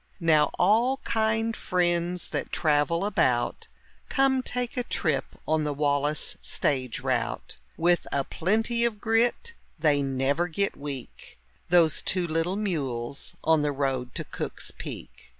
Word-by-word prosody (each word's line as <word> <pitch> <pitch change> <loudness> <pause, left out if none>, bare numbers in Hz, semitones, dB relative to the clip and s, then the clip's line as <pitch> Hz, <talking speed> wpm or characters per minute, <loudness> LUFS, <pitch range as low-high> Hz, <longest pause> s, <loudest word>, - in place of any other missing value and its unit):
Now 160 -3 +4
all 230 +8 +3
kind 220 0 0
friends 175 -1 0
that - - -3
travel 155 +3 +1
about, 125 -12 +1 0.4
Come 270 -1 +3
take 250 +1 -3
a 250 - +1
trip 155 - 0 0.2
on 155 0 +2
the 150 -1 -2
Wallis 145 +1 +1
stage 130 -3 -1
route. 125 -3 -2 0.2
With 175 +1 +2
a 140 - +1
plenty 225 - 0
of 230 -3 0
grit, 235 - +1 0.2
they 150 -3 +3
never 135 +5 0
get 195 +4 -1
weak, 140 -3 -8 0.3
Those 170 -3 +4
two 185 -2 +1
little 165 +3 0
mules 140 - -3
on 160 -1 +4
the 145 0 +1
road 135 -3 -2
to - - -2
Cook's - - -5
Peak. - - -9
165 Hz, 135 wpm, -27 LUFS, 140-210 Hz, 0.4 s, Now